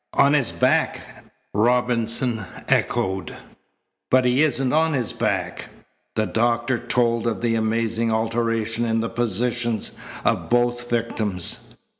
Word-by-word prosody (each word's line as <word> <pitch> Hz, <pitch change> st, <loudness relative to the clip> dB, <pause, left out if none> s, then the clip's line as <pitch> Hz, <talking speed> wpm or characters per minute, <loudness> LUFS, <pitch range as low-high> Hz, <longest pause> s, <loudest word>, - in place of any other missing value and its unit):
"On 140 Hz, +1 st, +5 dB
his 140 Hz, -5 st, +2 dB
back!" -, -, +1 dB, 0.5 s
Robinson 120 Hz, 0 st, +1 dB, 0.2 s
echoed. 95 Hz, -3 st, 0 dB, 0.7 s
"But 130 Hz, 0 st, +4 dB
he 125 Hz, +3 st, +3 dB
isn't 135 Hz, -4 st, +1 dB
on 160 Hz, +1 st, +3 dB
his 125 Hz, -5 st, -1 dB
back." -, -, -2 dB, 0.5 s
The 110 Hz, -, +1 dB
doctor 120 Hz, +2 st, +1 dB
told 115 Hz, -1 st, +1 dB
of 110 Hz, -4 st, -2 dB
the 120 Hz, -1 st, +1 dB
amazing 115 Hz, 0 st, 0 dB
alteration 115 Hz, 0 st, 0 dB
in 115 Hz, -1 st, +1 dB
the 115 Hz, -, -2 dB
positions 120 Hz, 0 st, -1 dB, 0.3 s
of -, -, 0 dB
both 120 Hz, 0 st, +1 dB
victims. 110 Hz, -6 st, -1 dB
115 Hz, 120 wpm, -23 LUFS, 115-120 Hz, 0.7 s, On